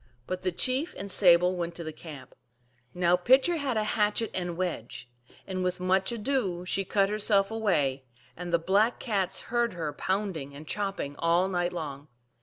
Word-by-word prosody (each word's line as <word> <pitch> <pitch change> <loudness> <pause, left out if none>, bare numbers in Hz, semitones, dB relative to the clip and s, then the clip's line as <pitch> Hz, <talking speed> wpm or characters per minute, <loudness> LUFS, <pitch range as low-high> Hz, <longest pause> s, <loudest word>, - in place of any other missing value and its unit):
But 185 +5 -4
the 185 - 0
chief 260 - -1
and 200 0 -5
Sable 180 -1 +5
went 170 -1 -3
to 170 - -6
the 155 -1 -6
camp. 150 -5 -11 0.6
Now 175 +2 +3
Pitcher 260 - +4
had 275 -6 -1
a 215 - +2
hatchet 210 +1 0
and 175 -2 -2
wedge, 125 -9 -4 0.3
and 185 -1 -3
with 180 0 -1
much 190 +3 +1
ado 210 -7 -1
she 195 +2 0
cut 195 +1 +2
herself 210 -1 +2
away, 145 -12 0 0.3
and 175 0 -6
the 170 - +4
Black 200 +8 +2
Cats 200 -6 -1
heard 240 0 0
her 160 -4 -3
pounding 185 -8 -2
and 150 +2 -10
chopping 195 -8 -3
all 170 +3 +3
night 175 -2 0
long. 145 -4 -6
185 Hz, 175 wpm, -28 LUFS, 170-210 Hz, 0.6 s, Sable